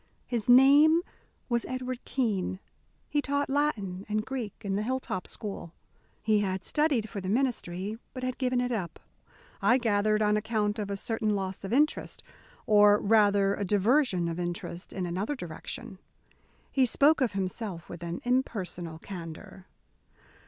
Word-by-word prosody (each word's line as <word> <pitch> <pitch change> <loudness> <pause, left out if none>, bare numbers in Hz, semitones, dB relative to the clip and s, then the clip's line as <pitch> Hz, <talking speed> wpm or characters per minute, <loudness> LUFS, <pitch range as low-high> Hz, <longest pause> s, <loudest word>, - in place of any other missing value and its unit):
His 235 -2 -3
name 290 +6 +7 0.4
was 235 -2 0
Edward 255 -1 -4
Keene; 210 -8 -1 0.5
he 295 - 0
taught 285 -1 -1
Latin 210 -11 -1
and 215 +1 0
Greek 250 -6 -4
in 195 -1 -1
the 205 - 0
Hilltop 250 -5 -3
School; 195 -5 -6 0.5
he 215 -1 +3
had 190 -2 -1
studied 285 - +1
for 205 -3 -6
the 185 - -4
ministry, 215 -4 -1
but 255 - -7
had 255 0 -3
given 255 -1 +1
it 250 0 -1
up, 195 -7 -3 0.6
I 250 - +5
gathered, 215 -2 +2
on 210 0 +3
account 210 0 -1
of 205 -1 -3
a 200 - -2
certain 215 0 -1
loss 190 -1 -4
of 195 - -5
interest, 295 +5 +1 0.4
or 210 -1 +6
rather 205 -2 +4
a 205 - -3
diversion 205 - +2
of 165 +1 -3
interest 175 0 -5
in 185 -2 -3
another 190 +11 -2
direction. 175 - -7 0.7
He 265 -2 +3
spoke 290 +5 +4
of 245 -5 +1
himself 190 -2 -4
with 170 - -9
an 170 0 -5
impersonal 190 -10 -2
candour. 185 +2 -9
210 Hz, 150 wpm, -29 LUFS, 190-255 Hz, 0.7 s, name